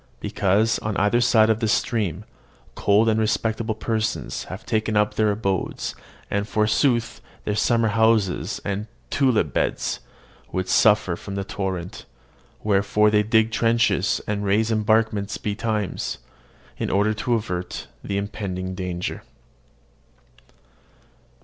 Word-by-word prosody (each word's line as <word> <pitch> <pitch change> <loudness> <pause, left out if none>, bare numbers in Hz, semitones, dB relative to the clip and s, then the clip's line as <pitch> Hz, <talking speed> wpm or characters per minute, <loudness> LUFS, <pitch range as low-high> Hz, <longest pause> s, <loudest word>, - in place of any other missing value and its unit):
Because, 105 +3 +1
on 105 -2 -3
either 105 +4 +3
side 110 -2 +5
of 110 - 0
this 110 -2 +2
stream, 105 -4 -1 0.5
cold 105 +2 +3
and 110 0 +2
respectable 110 0 0
persons 110 -1 -2
have - - -8
taken 110 -1 0
up 105 0 +2
their 110 0 +2
abodes, 100 -3 -2 0.4
and, 100 +1 0
forsooth, 115 +3 +1 0.2
their 105 - 0
summer 115 +2 +2
houses 110 -3 +2
and 100 +2 -2 0.2
tulip 130 -5 +2
beds - - -1 0.5
would 95 0 -2
suffer 105 -5 +4
from 100 +3 -8
the 100 - -2
torrent; 95 -3 -4 0.6
wherefore 105 +1 +3
they 105 0 +4
dig 110 +1 +2
trenches, 115 +1 +2
and 105 -1 -2
raise 105 +3 +2
embankments 110 -1 +1
betimes, 105 -1 -2 0.6
in - - -1
order 105 +2 +2
to 120 +3 0
avert 90 -5 -4 0.2
the 100 - -2
impending 100 -2 -4
danger. 90 -1 -4
105 Hz, 125 wpm, -23 LUFS, 100-110 Hz, 0.6 s, side